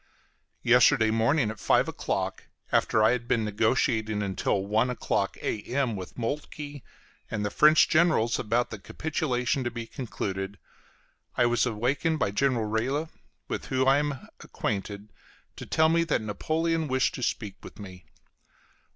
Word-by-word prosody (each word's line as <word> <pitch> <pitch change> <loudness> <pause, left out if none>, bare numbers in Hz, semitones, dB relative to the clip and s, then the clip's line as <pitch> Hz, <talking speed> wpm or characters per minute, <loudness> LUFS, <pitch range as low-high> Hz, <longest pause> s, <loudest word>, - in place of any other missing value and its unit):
Yesterday 110 -1 +5
morning 115 +2 +2
at 110 - -10
five - - +3
o'clock, - - -3 0.3
after 110 - +3
I 110 - +5
had 120 -1 -2
been 115 -3 +1
negotiating 110 0 +1
until 95 0 -1
one 110 +5 +1
o'clock 125 - -1
A.M. 120 +2 -1
with 95 -2 -8
Moltke 145 +3 -5 0.5
and 105 -1 -2
the 105 - -2
French 155 +6 +6
generals 155 -9 +3
about 115 +3 0
the 110 - -6
capitulation 130 - -2
to 120 - -1
be 120 -1 -6
concluded, 100 -5 -5 0.8
I 125 - +4
was 120 +1 +2
awakened 130 +8 0
by 100 - 0
General 120 +1 +1
Reille, 130 +9 -1 0.4
with - - -4
whom 130 0 0
I 135 +1 +5
am 145 -3 -3
acquainted, 100 +1 -4 0.4
to - - -8
tell 160 0 +3
me 165 +1 +3
that 155 -9 0
Napoleon 160 +9 -1
wished 130 -1 +1
to - - -6
speak 105 -4 -2
with - - -12
me. 90 -4 -11
120 Hz, 150 wpm, -27 LUFS, 105-140 Hz, 0.8 s, French